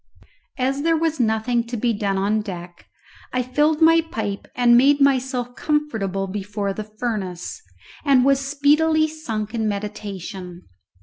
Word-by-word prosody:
As 270 +2 0
there 330 +1 +2
was 320 -2 -1
nothing 230 +1 +1
to 240 0 -4
be 235 +1 +1
done 200 -2 -1
on 205 +3 +1
deck, 175 -4 -9 0.4
I 250 0 0
filled 300 +5 +2
my 330 +1 +6
pipe 215 -11 -5
and 240 -1 +5
made 280 +4 +5
myself 260 -3 +1
comfortable 225 -11 -1
before 200 +1 -3
the 215 +1 -6
furnace, 195 - -4 0.4
and 270 -4 +4
was 275 0 +4
speedily 300 +3 +3
sunk 225 -9 -5
in 220 -2 -1
meditation. 200 -3 -6
240 Hz, 140 wpm, -22 LUFS, 205-285 Hz, 0.4 s, my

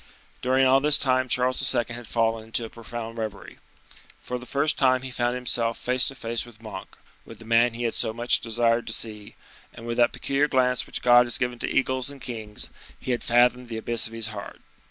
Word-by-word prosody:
During 130 +1 +3
all 130 +1 +5
this 150 +1 +6
time 130 -1 +1
Charles 125 +1 +1
II. 120 - +1
had 120 -1 -7
fallen 115 -1 0
into 115 +1 -3
a 110 - -10
profound 115 0 -7
reverie. 110 -3 -6 0.6
For 125 - -5
the 125 - -12
first 145 +2 +1
time 130 -1 +3
he 130 - -6
found 120 0 -1
himself 120 -2 0
face 125 0 +2
to 135 - -4
face 115 -2 -2
with 120 -2 -15
Monk; 110 -4 -9 0.3
with - - -12
the 115 - -14
man 115 +1 +3
he 120 - -4
had 115 - 0
so - - +1
much 120 +2 +2
desired 115 0 0
to 115 - 0
see; 105 -2 -4 0.4
and, 115 - -12
with 120 0 -3
that 120 -1 +4
peculiar 140 +2 0
glance 125 -3 +1
which - - -4
God 120 0 +6
has 120 - +3
given 125 -1 -2
to - - -2
eagles 130 0 0
and 140 -1 -11
kings, 110 -4 -5 0.3
he - - -4
had 120 - -1
fathomed 125 +1 +2
the 115 - -4
abyss 115 +1 -1
of 115 - -13
his 115 -1 -3
heart. 100 -2 -9
120 Hz, 220 wpm, -25 LUFS, 115-125 Hz, 0.6 s, this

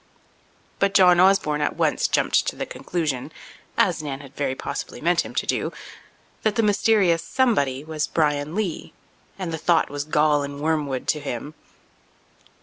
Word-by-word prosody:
But 200 0 +1
John 180 -2 +6
Osborne 180 -6 +3
at 150 - 0
once - - +1
jumped - - +2
to - - -2
the - - -4
conclusion—as 155 -3 -3
Nan 140 -2 -5
had 140 -2 -14
very 135 -2 -1
possibly 140 - -5
meant 175 +2 +2
him - - -10
to - - 0
do—that 215 -1 -5
the 230 - +2
mysterious 200 -5 +3
somebody 145 - +1
was 155 -1 -3
Bryan 150 0 0
Lee, 200 -6 -3 0.4
and 180 -4 -4
the 160 - -3
thought 165 -2 +2
was 145 0 -3
gall 150 -1 +2
and 140 0 -6
wormwood 150 -4 -1
to 150 - +2
him. 145 +1 -5
155 Hz, 150 wpm, -23 LUFS, 145-180 Hz, 0.4 s, John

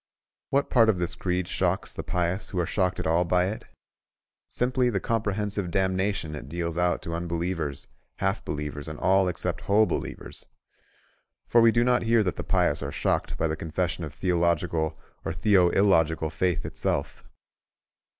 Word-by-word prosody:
What 140 +1 +1
part 115 -3 +5
of 105 - +3
this 85 0 -1
creed 90 0 -2
shocks - - 0
the - - -5
pious 90 +2 -2
who 95 - -5
are 85 - +1
shocked 90 0 0
at - - -3
all 85 +2 +3
by 90 +1 +2
it? 110 +3 -6 0.8
Simply 125 0 +1
the 100 -5 0
comprehensive 105 -3 -1
damnation 95 -3 0
it 75 -3 -7
deals 85 0 -3
out 90 0 +1
to 85 - -5
unbelievers, 85 -3 -3 0.3
half 95 +2 -1
believers, 75 0 -5
and 75 -1 -6
all 95 +2 +3
except 85 -1 -2
whole 100 +5 +4
believers. - - -5 1.0
For 120 - +4
we 115 0 +6
do 120 +1 +3
not 125 0 +3
hear 115 -1 +3
that 90 -4 -1
the - - -5
pious - - +1
are - - -4
shocked - - -1
by - - +1
the 80 - -2
confession 85 +2 -2
of 75 - -5
theological 85 -2 0 0.3
or - - -3
theoillogical 85 -4 +3
faith 90 0 0
itself. - - -3
90 Hz, 165 wpm, -26 LUFS, 85-100 Hz, 1.0 s, we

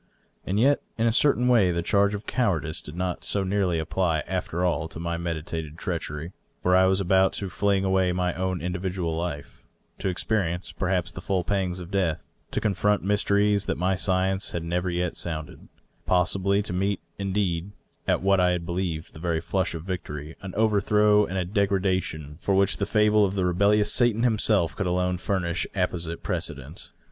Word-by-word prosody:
And 100 +3 0
yet 140 +5 +4 0.2
in 115 - +1
a 115 - +3
certain 125 -1 +4
way 115 -7 +5
the 85 -1 -1
charge 100 +2 +3
of 100 - -7
cowardice 80 - -1
did 75 - -10
not 90 0 -3
so 100 - -1
nearly 95 -3 +1
apply, 80 0 0
after 90 -1 -2
all, 85 -2 0
to 80 - -9
my 85 0 -2
meditated 80 -2 -4
treachery. 85 -3 -4 0.3
For 90 0 +4
I 95 0 +5
was 95 +1 +2
about 95 0 +3
to 95 -2 -4
fling 100 +1 +1
away 95 -1 +2
my 90 0 0
own 95 -2 -2
individual 90 -1 -2
life 80 -4 -5 0.2
— - - -38
to - - -2
experience, 90 -1 -1
perhaps, 90 -2 -1
the 85 - -8
full 90 0 0
pangs 95 -1 -1
of 90 +1 -9
death 90 -6 0
— - - -41
^to - - 0
confront 105 0 +1
mysteries 100 0 +2
that - - -1
my 90 +2 +1
science 95 +1 0
had 85 - -2
never 90 +2 -1
yet 90 0 -1
sounded 80 -3 -6 0.2
— - - -42
possibly 95 +3 +2
to 90 - -5
meet, 95 +1 0 0.2
indeed, 95 -3 -1 0.4
at - - +1
what 95 0 +4
I 90 0 +3
had 85 -1 -3
believed 85 -2 -3
the 80 - -11
very 85 -1 0
flush 90 +1 -1
of 80 - -6
victory, 80 -4 -5
an 95 -2 -7
overthrow 105 -1 +3
and 95 - -4
a 90 - 0
degradation 95 -6 -1
for 100 - +1
which 100 0 +3
the 100 - -1
fable 105 -1 +4
of 100 0 0
the 95 -2 +1
rebellious 100 +4 +3
Satan 120 -2 +3
himself 105 -7 +2
could 95 - -2
alone 90 0 0
furnish 90 -2 -1
apposite 85 -3 -2
precedent. - - -4
95 Hz, 190 wpm, -26 LUFS, 85-100 Hz, 0.4 s, way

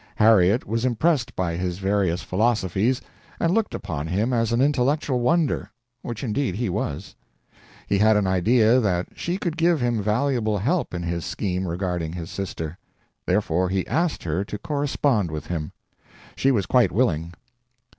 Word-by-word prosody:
Harriet 105 0 +4
was 115 +3 -2
impressed 130 +1 +1
by 85 -2 -1
his 90 0 -2
various 95 -3 0
philosophies 110 +3 +1 0.4
and 165 +1 +2
looked 225 -1 0
upon 80 -7 -4
him 105 +9 0
as 115 -1 +1
an 115 - +1
intellectual 140 0 +1
wonder 155 +5 +1 0.3
which 120 0 -6
indeed 125 -3 -1
he 115 0 -1
was. 75 -4 -3 0.7
He 100 - +1
had 110 0 +5
an 105 - +1
idea 110 +6 +4
that 90 -6 0
she 175 +2 -3
could 175 -4 -3
give 165 -1 +3
him 120 -3 0
valuable 110 0 +1
help 135 - -1
in 85 - -3
his 85 0 -2
scheme 95 -2 -2
regarding 85 -2 -2
his 85 -2 -6
sister; 85 -4 -5 0.5
therefore 90 -2 +1
he 95 0 -1
asked 165 0 -1
her 85 +3 -1
to 105 +1 -6
correspond 140 - 0
with 75 -1 -5
him. 80 -3 -4 0.6
She 135 - +2
was 110 -8 +2
quite 125 +4 +3
willing. 85 -8 0
105 Hz, 160 wpm, -24 LUFS, 90-125 Hz, 0.7 s, had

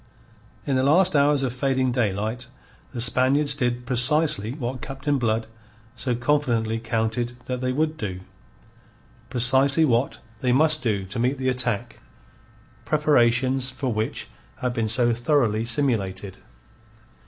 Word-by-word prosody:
In 135 - 0
the 130 - +2
last 165 +6 +3
hours 145 -1 +3
of 125 -2 -1
fading 130 0 0
daylight, 110 +1 -2 0.4
the 125 - -6
Spaniards 130 +4 +3
did 125 -3 -2
precisely 130 -2 +1
what 130 -3 -5
Captain 135 +1 -2
Blood 115 -1 0 0.5
so 125 +1 -2
confidently 120 -4 0
counted 115 +1 -2
that 125 -1 -4
they 130 0 0
would 155 +3 -1
do 95 -3 -5 1.1
precisely 130 +5 +2
what 120 -1 +1 0.2
they 125 - 0
must 155 +4 +4
do 100 -5 -1
to 100 +5 -6
meet 125 +4 +1
the 130 0 -1
attack, 125 -5 -1 0.8
preparations 130 -3 +2
for 130 -1 -3
which 110 +1 -3 0.3
had 125 -1 -3
been 115 -2 -1
so 120 +1 +2
thoroughly 120 -3 +1
simulated. 105 -7 -2
125 Hz, 130 wpm, -24 LUFS, 115-135 Hz, 1.1 s, must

